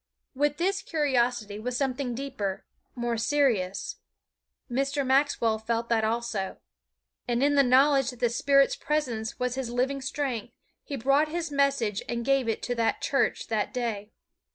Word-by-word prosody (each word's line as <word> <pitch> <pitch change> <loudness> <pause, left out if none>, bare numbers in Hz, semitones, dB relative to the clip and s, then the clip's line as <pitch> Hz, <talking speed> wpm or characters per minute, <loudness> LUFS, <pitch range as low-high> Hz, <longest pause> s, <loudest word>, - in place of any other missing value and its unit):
With 290 +2 +1
this 390 +3 0
curiosity 245 - 0
was 245 +2 -2
something 260 -2 -1
deeper, 235 -8 -4 0.3
more 240 -1 -1
serious. 230 -7 0 0.7
Mr. 275 +2 -1
Maxwell 260 -5 +2
felt 230 +1 -2
that 225 -2 +2
also. 220 -3 -2 0.7
And 240 +1 +1
in 290 +1 +4
the 285 - +6
knowledge 270 +1 +4
that 250 -3 -9
the 240 -2 +2
Spirit's 275 +3 +3
presence 245 -8 -2
was 250 -1 -1
his 260 -2 -3
living 260 +3 -1
strength, 260 -4 -3 0.3
he 285 - -5
brought 275 +5 +3
his 330 0 -3
message 275 -8 +1
and 235 -1 -2
gave 275 -3 +2
it 225 - -2
to 245 - -1
that 230 -2 0
church 275 - +1
that 220 +3 -1
day. 220 -4 -2
250 Hz, 155 wpm, -27 LUFS, 230-275 Hz, 0.7 s, the